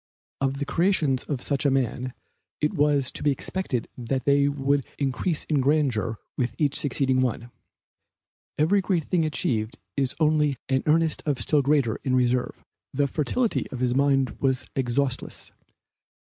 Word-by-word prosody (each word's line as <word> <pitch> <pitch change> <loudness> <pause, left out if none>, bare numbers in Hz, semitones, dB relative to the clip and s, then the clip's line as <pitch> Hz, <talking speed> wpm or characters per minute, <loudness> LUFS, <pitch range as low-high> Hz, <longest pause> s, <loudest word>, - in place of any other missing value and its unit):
Of 135 0 0
the 140 - -2
creations 155 -4 +1
of 135 -4 -3
such 140 -1 0
a 145 - +4
man, 130 -1 -1 0.4
it 150 +6 0
was 145 -4 +2
to - - -5
be 150 - +2
expected 140 -2 -2
that 130 +2 -3
they 140 0 +4
would 140 0 +1
increase 145 +4 0
in 150 -3 0
grandeur 130 -6 +1 0.2
with 125 -2 -2
each 145 -3 +1
succeeding 130 -2 +1
one. 120 -1 -2 1.1
Every 185 +7 +3
great 185 -4 0
thing 165 +1 +1
achieved 120 -5 -1 0.2
is 135 -2 0
only 150 -3 +2
an 130 -1 +2
earnest 160 +1 +2
of 140 -3 0
still 150 -2 +2
greater 135 -5 +2
in 130 -1 +1
reserve. 125 0 0 0.3
The 145 -1 +1
fertility 205 - -1
of 130 - -6
his 125 -1 +1
mind 135 -2 +2
was 130 -2 0
exhaustless. 130 0 -1
140 Hz, 155 wpm, -25 LUFS, 130-150 Hz, 1.1 s, a